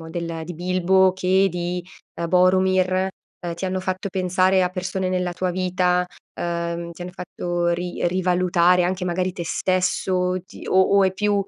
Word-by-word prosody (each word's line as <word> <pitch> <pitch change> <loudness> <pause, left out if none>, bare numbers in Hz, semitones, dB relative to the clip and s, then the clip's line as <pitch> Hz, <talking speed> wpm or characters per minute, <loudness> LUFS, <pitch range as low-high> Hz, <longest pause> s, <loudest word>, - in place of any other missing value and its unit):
diciamo 160 0 -9
del 165 -1 -4
di 175 +1 -7
Bilbo 185 +2 +3
che 190 +1 +2
di, 175 0 -3 0.3
ehm, 170 0 -3
Borumir, 185 +1 +3 0.5
ehm, 170 -2 -4
ti 170 - -6
hanno 185 0 -1
fatto 185 +2 -3
pensare 185 0 +2
a 180 - +2
persone 185 0 -3
nella 180 -1 -1
tua 185 +1 -2
vita, 180 0 +1 0.4
uhm, 170 0 -3
ti 175 - -9
hanno 180 - -6
fatto 175 -1 -3
ri 175 0 -1
rivalutare 180 0 +3
anche 180 0 -1
magari 180 +1 -1
te 175 - -5
stesso, 185 +2 0
o 180 0 +1
ti - - -12
o 190 - +4 0.2
o 195 - +5
è 190 - +2
più 205 +1 0
180 Hz, 180 wpm, -22 LUFS, 175-185 Hz, 0.5 s, o